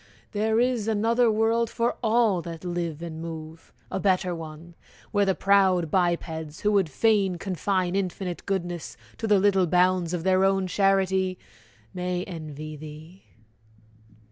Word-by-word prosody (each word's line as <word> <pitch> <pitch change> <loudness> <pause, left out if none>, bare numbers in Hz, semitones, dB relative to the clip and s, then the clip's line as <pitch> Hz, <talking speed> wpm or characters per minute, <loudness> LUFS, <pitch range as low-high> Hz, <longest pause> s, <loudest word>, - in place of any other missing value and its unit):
There 220 +1 +1
is 245 -3 +1
another 225 +2 +2
world 225 +1 +1
For 235 0 -1
all 220 -5 +2
that 165 0 -8
live 170 -2 -3
and 160 -1 -6
move 160 -1 -8 0.2
a - - -2
better 185 -2 +1
one! 165 +1 -9 0.4
Where 205 -2 +2
the 190 - +2
proud 190 -5 +3
bipeds, 165 -4 -1
who 210 - +2
would 195 -5 +2
fain 195 +2 +2
confine 185 0 -1
Infinite 185 -2 -3
goodness 175 -4 -3 0.2
to 225 - -2
the 210 -1 +5
little 190 -2 +3
bounds 180 0 +2
Of 165 - -4
their 190 0 +3
own 195 0 +2
charity, 190 -1 +1 0.6
may 180 0 -2
envy 155 -3 -7
thee! 155 +5 -11
185 Hz, 145 wpm, -26 LUFS, 170-200 Hz, 0.6 s, the